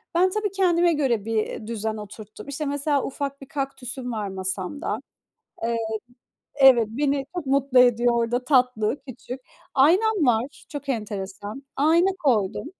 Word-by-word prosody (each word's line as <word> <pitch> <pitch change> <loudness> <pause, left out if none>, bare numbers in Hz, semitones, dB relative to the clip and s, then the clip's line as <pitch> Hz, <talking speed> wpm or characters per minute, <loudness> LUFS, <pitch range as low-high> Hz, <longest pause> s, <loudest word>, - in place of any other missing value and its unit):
Ben 370 +2 +4
tabii 415 0 -1
kendime 350 -3 +3
göre 245 -8 0
bir 220 -1 -2
düzen 220 -1 -3
oturttum. 210 +2 -10
İşte, 285 +2 -4
mesela 285 0 0
ufak 280 0 -4
bir 275 - -10
kaktüsüm 265 -2 -4
var 215 -3 -3
masamda. 190 +6 -3 0.7
Eee, 230 0 0 0.8
evet, 265 -5 +6
beni 275 +4 0
çok 345 -5 -3
mutlu 270 -1 +3
ediyor 245 -1 +5
orada, 235 +2 0
tatlı, 250 -3 +2
küçük. 255 +1 -7 0.3
Aynam 355 +5 +4
var. 245 +4 0
Çok 290 -2 -7
enteresan. 205 0 -4
Ayna 325 +6 +4
koydum. 220 - +1
260 Hz, 135 wpm, -24 LUFS, 225-285 Hz, 0.8 s, evet